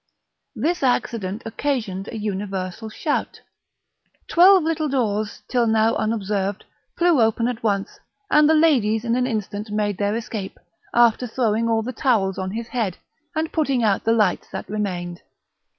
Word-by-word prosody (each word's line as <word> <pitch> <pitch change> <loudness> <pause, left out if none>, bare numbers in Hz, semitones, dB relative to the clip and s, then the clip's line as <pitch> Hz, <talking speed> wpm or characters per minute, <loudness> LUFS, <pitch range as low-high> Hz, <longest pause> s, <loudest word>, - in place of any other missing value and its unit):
This 345 +3 -1
accident 225 -6 -1
occasioned 225 -5 -2
a 230 - -6
universal 195 0 -4
shout; 295 +7 -2 0.9
twelve 370 +1 +6
little 315 -1 -1
doors, 215 -5 -1
till 245 -2 +1
now 220 0 +3
unobserved, 205 -2 -1 0.3
flew 340 -6 +4
open 225 +1 +2
at 245 -2 -3
once, 200 -3 -1 0.3
and 300 0 +5
the 320 - +5
ladies 245 -9 +3
in 235 0 +1
an 250 0 +1
instant 210 -2 -4
made 205 -2 -1
their 205 +1 0
escape, 220 -4 -5 0.3
after 240 +1 +3
throwing 230 -1 0
all 225 -1 +1
the 255 +3 -5
towels 200 -9 +1
on 185 0 -2
his 225 +4 -5
head, 215 -8 -2 0.4
and 315 0 -2
putting 275 -6 +1
out 205 -3 +2
the 225 - +2
lights 210 -5 +1
that - - -6
remained. 180 -4 -4
225 Hz, 150 wpm, -22 LUFS, 205-250 Hz, 0.9 s, twelve